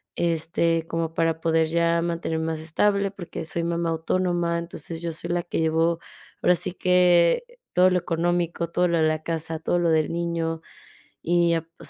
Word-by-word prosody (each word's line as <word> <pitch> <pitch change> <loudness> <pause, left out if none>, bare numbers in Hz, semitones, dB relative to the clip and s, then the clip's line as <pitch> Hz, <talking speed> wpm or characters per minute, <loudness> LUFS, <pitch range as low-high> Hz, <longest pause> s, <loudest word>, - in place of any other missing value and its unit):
este, 165 0 0
como 165 -1 -2
para 165 -1 0
poder 160 -1 +2
ya 170 +1 +2
mantenerme 165 -1 -2
más 160 -1 -3
estable. 200 +5 +1
Porque 180 -4 -7
soy 170 +1 -2
mamá 170 0 -1
autónoma, 170 +1 0
entonces 165 -1 -7
yo 170 -1 -3
soy 170 +2 -5
la 175 0 +1
que 170 - -3
llevo, 165 +1 +1 0.4
ahora 180 - +4
sí 175 +2 -1
que 180 - +4 0.3
todo 180 +1 +5
lo 180 - +3
económico, 170 0 -1
todo 180 +1 +1
lo 170 -1 +1
de 160 - +3
la 155 0 -1
casa, 160 -1 -3
todo 175 - 0
lo 170 -1 +2
del 155 -1 +2
niño. 165 -1 -2 0.6
Y, 170 0 +2
ah, 165 - 0 0.2
pues, 165 - -7
170 Hz, 180 wpm, -24 LUFS, 165-175 Hz, 0.6 s, todo